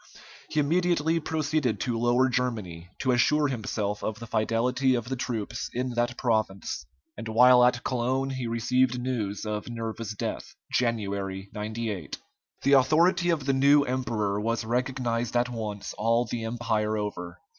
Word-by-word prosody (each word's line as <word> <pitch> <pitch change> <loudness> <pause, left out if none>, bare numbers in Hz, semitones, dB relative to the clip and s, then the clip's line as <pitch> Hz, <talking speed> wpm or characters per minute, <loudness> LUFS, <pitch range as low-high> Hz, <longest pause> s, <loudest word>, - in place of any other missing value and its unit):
He 155 - 0
immediately 165 +1 +2
proceeded 155 -5 -1
to 120 -2 -1
Lower 120 +3 +3
Germany, 110 -10 -2
to 130 - +2
assure 145 +4 +3
himself 105 -4 -3
of 110 0 -2
the 115 - -8
fidelity 125 +4 +1
of 120 0 -3
the 135 - -1
troops 115 -2 -3
in 125 +1 -1
that 120 0 -1
province, 110 -6 -1 0.3
and 115 +2 -7
while 125 +2 +6
at 125 -1 +3
Cologne 130 +2 0
he 130 -2 -3
received 125 +2 +1
news 115 -5 -3
of 105 +2 -3
Nerva's 115 -2 -5
death - - -5 0.2
(January, 100 -5 -1
98). 105 -4 -4 0.5
The 140 - +4
authority 165 +6 +4
of 155 -5 0
the 135 - +2
new 140 +2 +5
emperor 115 -6 -1
was 115 +1 -1
recognized 120 -1 -1
at 120 +1 +1
once 110 -4 -5
all 115 +3 +2
the 115 -2 -4
Empire 110 -2 -1
over. 90 -4 -5
120 Hz, 150 wpm, -27 LUFS, 110-130 Hz, 0.5 s, while